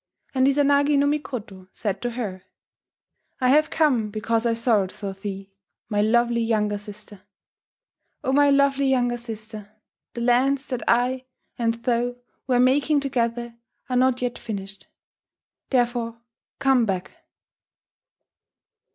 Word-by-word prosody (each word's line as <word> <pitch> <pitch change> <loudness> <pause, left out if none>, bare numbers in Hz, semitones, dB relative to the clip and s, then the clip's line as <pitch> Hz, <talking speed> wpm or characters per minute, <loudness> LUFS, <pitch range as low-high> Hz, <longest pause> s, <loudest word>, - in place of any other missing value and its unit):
And 260 0 +3
Izanagi 285 +1 +3
no 280 - +3
Mikoto 240 -10 -3
said 205 -5 -3
to 245 - -1
her: 215 -6 -5 1.0
"I 255 -1 +2
have 305 +3 +4
come 260 -9 +2
because 225 +2 -1
I 230 - +2
sorrowed 225 -5 +1
for 200 -2 -6
thee, 195 0 -7 0.4
my 205 -2 +1
lovely 235 +2 +2
younger 210 -2 0
sister. 205 -1 -11 1.0
O 265 - 0
my 285 +1 +5
lovely 280 0 +3
younger 245 -2 +1
sister, 220 -3 -8 0.5
the 235 - -4
lands 260 +3 +2
that 250 -3 -2
I 250 +2 +2 0.3
and 230 -1 +1
thou 245 0 0 0.3
were 250 -2 +3
making 280 +4 +3
together 235 -3 -2 0.4
are - - +1
not 255 0 +2
yet 245 -1 -2
finished; 195 -2 -7 0.8
therefore 240 -2 0 0.4
come 265 -4 +3
back!" 185 -2 -2
240 Hz, 125 wpm, -24 LUFS, 215-260 Hz, 1.0 s, my